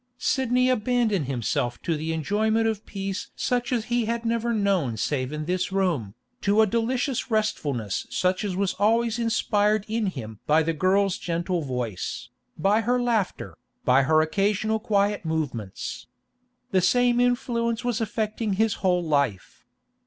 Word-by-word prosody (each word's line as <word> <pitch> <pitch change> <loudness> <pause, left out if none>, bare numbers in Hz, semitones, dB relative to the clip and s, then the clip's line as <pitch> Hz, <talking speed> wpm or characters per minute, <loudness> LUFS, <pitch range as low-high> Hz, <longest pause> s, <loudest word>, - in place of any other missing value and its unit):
Sidney 250 -1 +1
abandoned 230 - +1
himself 120 -1 -1
to 165 - 0
the 155 +2 -3
enjoyment 215 +8 +1
of 220 -2 -2
peace 195 -1 -4
such 245 0 -1
as 235 -3 0
he 240 -1 0
had 230 +1 -2
never 230 +1 0
known 195 - +1
save 130 +3 -1
in 150 0 -4
this 185 +2 -1
room, 170 - 0 0.3
to 205 +2 +4
a - - +5
delicious 245 +5 -1
restfulness 145 - -1
such 185 +1 0
as 200 -3 -2
was 195 0 0
always 230 +2 +2
inspired 215 -2 +1
in 220 -1 -1
him 110 - -6
by 155 +2 +4
the 165 +1 0
girl's 190 +3 +2
gentle 175 +1 -1
voice, 125 - -4 0.3
by 200 +7 +3
her 245 +3 +1
laughter, 235 -5 -1 0.3
by 130 +2 +5
her 155 +4 +4
occasional 205 +6 +1
quiet 205 -2 +1
movements. 145 - -4 0.6
The 190 -2 +3
same 245 +5 +3
influence 240 -1 0
was 240 -2 0
affecting 220 0 -2
his 220 +2 +2
whole 180 -2 +2
life. 140 - -1
200 Hz, 150 wpm, -25 LUFS, 160-230 Hz, 0.6 s, a